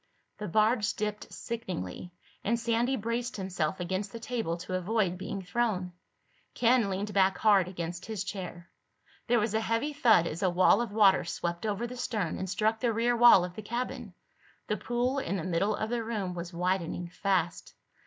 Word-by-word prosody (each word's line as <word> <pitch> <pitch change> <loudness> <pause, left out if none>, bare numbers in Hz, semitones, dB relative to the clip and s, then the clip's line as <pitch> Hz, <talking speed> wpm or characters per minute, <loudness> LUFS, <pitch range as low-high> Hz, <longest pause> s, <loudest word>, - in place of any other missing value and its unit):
The 210 - -4
barge 215 +3 +2
dipped 210 -1 -4
sickeningly 180 - -5 0.3
and 235 +3 +1
Sandy 235 +3 +1
braced 230 +1 -3
himself 185 -3 -2
against 190 +3 -2
the 230 - -7
table 225 -8 -2
to 180 +1 -7
avoid 185 0 0
being 195 +1 -5
thrown. 190 -3 -1 0.6
Ken 235 -3 +3
leaned 200 +2 -3
back 190 0 +3
hard 200 -4 +4
against 175 -1 -5
his 215 -3 -3
chair. 180 -3 -7 0.6
There 240 0 +4
was 215 -1 0
a 220 - +1
heavy 230 +7 -1
thud 230 - +5
as 165 0 -4
a 190 - +3
wall 180 +6 +4
of 235 -4 -3
water 200 -3 +5
swept 170 +3 -3
over 210 +3 -1
the 250 +1 -7
stern 220 -9 -2
and 190 - -3
struck 220 +3 +1
the 235 0 +1
rear 235 +2 +1
wall 235 -6 +7
of 180 - -8
the 215 - -6
cabin. 240 -2 -4 0.5
The 210 - -1
pool 245 +6 -1
in 195 -7 -2
the 170 - -4
middle 185 +4 +1
of 220 +1 -3
the 240 -1 -1
room 210 -5 -3
was 175 0 -6
widening 175 0 -1
fast. 180 -2 -1
205 Hz, 185 wpm, -29 LUFS, 180-230 Hz, 0.6 s, wall